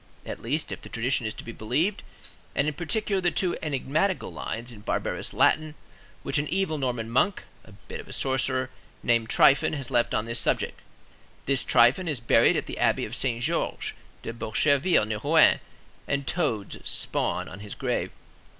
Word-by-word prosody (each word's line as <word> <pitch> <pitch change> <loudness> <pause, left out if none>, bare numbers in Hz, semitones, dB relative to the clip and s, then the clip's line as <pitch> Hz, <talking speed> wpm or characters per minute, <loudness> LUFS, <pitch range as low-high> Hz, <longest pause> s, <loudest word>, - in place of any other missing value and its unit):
At - - -6
least, 145 +7 -2
if - - -5
the - - -10
tradition 120 0 0
is 110 - -3
to - - -8
be 115 - -7
believed, 140 - -1 0.5
and 140 - +2
in 155 - 0
particular 195 +5 -1
the 175 - +3
two 180 0 0
enigmatical 150 +4 -1
lines 120 +2 -5
in 110 - -11
barbarous 105 - -2
Latin, 155 -1 +2 0.5
which - - 0
an 145 - -2
evil 180 -4 -1
Norman 125 -4 -2
monk, 130 - +1 0.2
a 105 - -15
bit 100 - -10
of - - -9
a - - -8
sorcerer, 130 -1 +1 0.3
named 115 -1 +2
Tryphon 140 +3 +5
has 135 -4 -5
left 120 -2 +2
on 105 - 0
this 115 0 -2
subject. - - 0 0.7
This 135 -1 +1
Tryphon 125 +10 +4
is 150 -6 -2
buried 115 - +4
at - - -1
the - - -7
Abbey - - +2
of 115 - -6
Saint 120 -3 -1
Georges - - -1 0.3
de 115 - -4
Bocherville, 130 +6 +2
near 110 0 -3
Rouen, 155 +7 +5 0.5
and 140 0 -1
toads 120 - -1
spawn - - 0
on 95 - -9
his 100 0 -8
grave. - - -1
130 Hz, 180 wpm, -26 LUFS, 115-155 Hz, 0.7 s, Tryphon